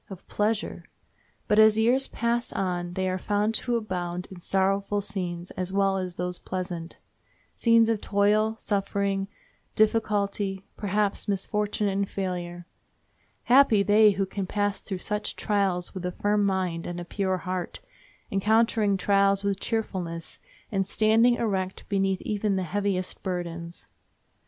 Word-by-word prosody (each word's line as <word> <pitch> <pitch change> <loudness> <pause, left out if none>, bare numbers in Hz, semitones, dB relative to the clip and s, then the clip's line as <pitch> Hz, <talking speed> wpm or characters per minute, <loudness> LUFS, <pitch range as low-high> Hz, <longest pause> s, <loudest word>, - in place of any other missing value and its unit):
of 190 -2 -10
pleasure! 210 +1 -1 0.6
But 210 - +4
as 220 0 +7
years 245 +5 +3
pass 235 +1 -1
on 175 -2 -2
they 185 +1 -1
are 185 0 -1
found 210 +3 0
to 240 +1 0
abound 180 -4 -4
in 185 - -9
sorrowful 195 +3 +1
scenes 180 -3 -3
as 185 0 -4
well 195 0 +2
as 185 -2 -4
those 180 0 -3
pleasant—scenes 185 +5 -1
of 225 -2 0
toil, 210 +2 +2
suffering, 200 -1 -1 0.5
difficulty, 205 -3 +1
perhaps 205 0 -1
misfortune 210 +1 -1
and 195 0 -1
failure. 175 -2 -4 0.8
Happy 245 -5 +5
they 210 +1 +6
who 195 0 0
can 190 0 -4
pass 205 0 -1
through 195 - -4
such 210 +3 -3
trials 195 -4 0
with 185 - -6
a 180 - -2
firm 205 +2 +1
mind 185 -3 -1
and 175 0 -4
a 175 - -6
pure 190 0 -1
heart, 180 +1 -4 0.5
encountering 215 0 +2
trials 200 +1 +3
with 200 -1 0
cheerfulness, 180 -8 -3 0.3
and 195 -2 +1
standing 220 +4 +3
erect 190 -5 -2
beneath 195 -2 +1
even 210 -1 0
the 190 - 0
heaviest 190 0 -2
burdens. 170 -2 -5
195 Hz, 135 wpm, -26 LUFS, 185-210 Hz, 0.8 s, as